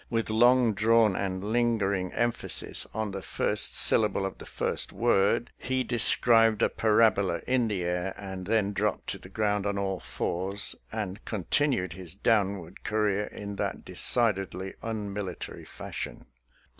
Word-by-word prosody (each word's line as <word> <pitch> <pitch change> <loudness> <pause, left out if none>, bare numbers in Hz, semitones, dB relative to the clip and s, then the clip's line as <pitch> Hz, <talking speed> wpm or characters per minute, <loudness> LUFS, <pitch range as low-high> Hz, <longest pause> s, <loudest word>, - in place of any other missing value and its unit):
" - - -34
with 115 -2 -1
long 120 +1 +4
drawn 110 -1 +3
and 95 -1 -3
linger 110 -2 +1
ing 90 -2 -2
emphasis 120 0 +1
on 110 -1 -3
the 95 0 -5
first - - 0
syllable 105 -3 +3
of 95 - -6
the - - -10
first - - -2
word, 115 0 +1
he 130 0 -1
described 115 -2 +4
a - - +4
parabola 105 -5 +2
in 125 -2 +1
the 100 -4 -2
air 90 +2 -2
and 95 -2 -7
then 105 -2 +1
dropped 105 0 -1
to - - -3
the 95 - -13
ground 105 0 0
on 100 0 -1
all 95 -2 -2
fours, 95 +4 -2 0.2
and 105 -3 -5
con 105 -5 -4
tinued 125 - +1
his 90 -1 -6
downward 100 -5 0
career 105 -1 0
in 100 -1 -8
that - - -3
decidedly 95 -5 0
unmilitary 105 -4 -5
fashion. - - -7
105 Hz, 155 wpm, -28 LUFS, 95-115 Hz, 0.2 s, long